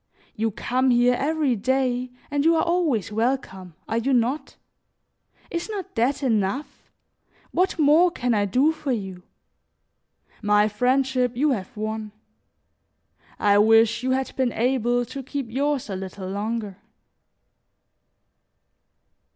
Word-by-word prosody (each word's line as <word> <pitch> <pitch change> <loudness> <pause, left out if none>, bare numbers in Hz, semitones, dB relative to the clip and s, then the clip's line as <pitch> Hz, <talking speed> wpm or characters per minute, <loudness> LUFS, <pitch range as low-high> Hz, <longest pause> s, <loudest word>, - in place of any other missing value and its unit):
You 225 +1 0
come 255 +5 0
here 245 0 +4
every 290 0 0
day 255 +2 0 0.2
and 285 -1 +1
you 330 +1 +4
are 320 - +2
always 330 - 0
welcome, 210 - -2
are 225 - 0
you 265 +4 0
not? 250 +5 0 1.0
Is 340 +4 -3
not 400 -5 -6
that 260 +5 0
enough? 230 +3 -2 0.6
What 370 +1 +1
more 315 +4 +5
can 245 -7 -1
I 205 -2 +2
do 255 +10 +3
for 300 -3 -4
you? 190 -6 -4 1.2
My 210 0 +3
friendship 250 +2 +1
you 295 +3 +2
have 235 0 -4
won; 215 0 -4 1.2
I 205 0 +4
wish 225 +2 +4
you 255 - -2
had 265 0 -1
been 255 -3 0
able 245 0 +1
to 275 +4 -7
keep 270 -2 -5
yours 280 0 -1
a 195 - -4
little 190 0 -7
longer." 205 0 -4
245 Hz, 125 wpm, -24 LUFS, 215-275 Hz, 1.2 s, more